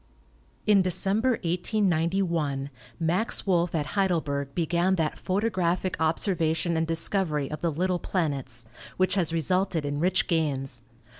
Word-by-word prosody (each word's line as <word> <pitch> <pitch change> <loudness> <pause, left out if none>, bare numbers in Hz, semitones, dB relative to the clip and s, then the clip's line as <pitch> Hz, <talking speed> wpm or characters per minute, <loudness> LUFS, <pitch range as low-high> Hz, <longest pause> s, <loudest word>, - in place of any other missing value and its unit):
In 210 -2 +5
December, 195 +7 +2
1891, 170 -5 0 0.3
Max 175 +7 0
Wolff 175 -3 +1
at 150 -2 0
Heidelberg 155 -8 0
began 175 +2 +1
that 160 -4 -1
photographic 185 -3 0
observation 165 0 +1
and 160 0 0
discovery 165 -3 0
of 155 -1 -5
the 170 - +1
little 180 +3 0
planets, 135 - -2 0.3
which 185 0 +2
has 180 -5 +2
resulted 170 0 0
in 145 0 -2
rich 185 +3 +2
gains. 135 -7 -1
170 Hz, 125 wpm, -27 LUFS, 155-185 Hz, 0.3 s, In